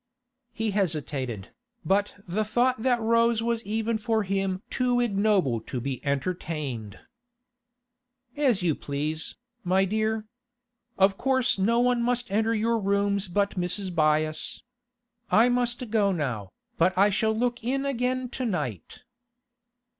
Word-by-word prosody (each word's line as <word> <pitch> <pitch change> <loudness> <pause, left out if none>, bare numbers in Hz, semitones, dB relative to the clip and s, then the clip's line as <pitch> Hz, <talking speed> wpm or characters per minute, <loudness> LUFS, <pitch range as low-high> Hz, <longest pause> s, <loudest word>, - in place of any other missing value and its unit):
He 225 -2 -2
hesitated, 145 - -2 0.4
but 200 +2 +1
the 200 +5 0
thought 240 +3 +1
that 245 -1 +2
rose 230 0 +3
was 235 0 -1
even 220 +2 -1
for 220 -1 0
him 195 0 -1
too 250 -1 +1
ignoble 200 - +2
to 125 - -5
be 130 0 -4
entertained. 140 - -3 1.4
'As 255 -10 +2
you 165 -3 +3
please, 150 +3 -4 0.3
my 190 +1 +3
dear. 215 +2 -1 0.7
Of 195 0 +3
course 260 -5 +2
no 225 +5 +2
one 245 0 +2
must 245 -2 -1
enter 220 +2 +2
your 225 +1 +1
rooms 200 0 0
but 200 +3 +1
Mrs. 185 +2 -1
Byass. 155 -1 0 0.7
I 230 +3 +5
must 245 -1 -1
go 205 -3 +3
now, 125 - -2 0.3
but 185 +2 +3
I 200 +2 +5
shall 220 +2 +1
look 240 0 -1
in 270 +3 -1
again 255 -1 -1
to 255 0 -4
night. 145 - -4
205 Hz, 130 wpm, -26 LUFS, 170-235 Hz, 1.4 s, I